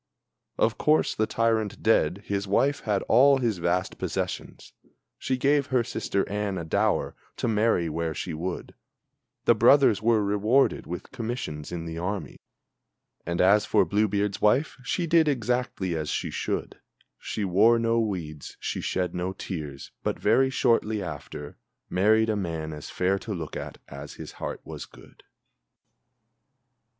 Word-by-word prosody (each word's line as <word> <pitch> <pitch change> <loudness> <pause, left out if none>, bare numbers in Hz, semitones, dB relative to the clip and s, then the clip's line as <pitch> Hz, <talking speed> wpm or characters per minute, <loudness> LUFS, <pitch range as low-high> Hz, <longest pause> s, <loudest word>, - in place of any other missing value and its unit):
Of - - +1
course, 155 +1 +3
the 110 - 0
tyrant 110 -2 0
dead, 100 -3 +2
his 100 0 -2
wife 140 +8 +2
had 105 -3 +1
all 135 +4 +5
his 115 -7 -1
vast 90 +2 -1
possessions; - - -4 0.5
She 130 - -1
gave 140 +1 +2
her 125 -2 +2
sister 100 -3 -2
Anne 105 -2 -2
a 85 - -4
dower 80 - +1 0.2
to - - -1
marry 110 -6 +2
where 80 0 -2
she 85 - -4
would; 85 +3 -5 0.7
The - - +6
brothers 120 0 +5
were 110 -1 +3
rewarded 105 +7 +2
with 90 +1 -6
commissions 110 -11 -5
in 85 -1 -4
the 80 0 -5
army; 90 -4 -4 0.9
And 85 0 -2
as 100 +3 +4
for 105 - +4
Blue 105 +1 +2
beard's 100 0 -1
wife, 130 +9 +3
she 175 +7 -1
did 165 -1 +4
exactly 125 - -1
as 75 -1 -3
she - - -2
should, - - -3 0.4
She 105 - -3
wore 105 +6 +5
no 115 0 +2
weeds, 85 -9 -4
she - - -3
shed 90 -2 -1
no 90 +1 -2
tears; 75 -8 -6
but - - -2
very 135 0 +3
shortly 115 -5 +1
after 75 -2 -7 0.3
Married 110 +4 +4
a - - 0
man 80 -5 -3
as 75 - -8
fair 95 +2 0
to 105 -1 -5
look 80 -4 -6
at - - -6
as 70 +1 -9
his - - -8
heart - - -4
was - - -8
good. - - -18
105 Hz, 155 wpm, -26 LUFS, 85-115 Hz, 0.9 s, The